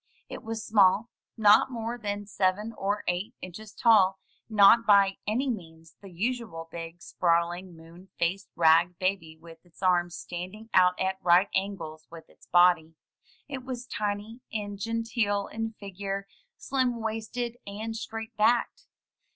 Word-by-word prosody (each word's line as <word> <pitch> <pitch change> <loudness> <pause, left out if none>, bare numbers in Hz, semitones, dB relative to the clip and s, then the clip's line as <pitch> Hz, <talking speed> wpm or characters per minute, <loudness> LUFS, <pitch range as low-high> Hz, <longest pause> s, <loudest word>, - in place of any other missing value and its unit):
It - - -7
was 225 0 -5
small 210 +2 +4
— - - -67
^not 215 +4 +6
more 230 -1 -4
than 205 -3 -4
seven 200 +2 -1
or 205 +1 -2
eight 190 +7 -2
inches 200 +4 -9
tall 200 -5 +4 0.2
— - - -43
not 215 +2 +6
by 200 -2 +5
any 245 +6 0
means 165 -8 -6
the 195 - -11
usual 200 -3 -3
big, 165 +1 -8
sprawling, 175 +1 0
moon 165 +3 -15
faced 185 +3 -1
rag 170 +2 +4
baby 185 -4 -2
with 165 0 -15
its 175 +1 -17
arms 175 -2 +2
standing 185 +6 -8
out 180 -1 +4
at 190 0 -1
right 180 +3 +4
angles 185 -5 -3
with 165 -1 -12
its - - -22
body. 175 -2 +4 0.5
It 270 -3 -6
was 250 -1 -6
tiny 210 +1 -4
and 205 -2 -4
genteel 225 -2 -1
in 225 0 -4
figure, 195 -1 -5 0.3
slim 255 -3 -1
waisted, 225 +2 -4
and 220 +3 -5
straight 225 0 -6
backed. 240 - +1
200 Hz, 150 wpm, -28 LUFS, 175-225 Hz, 0.5 s, ^not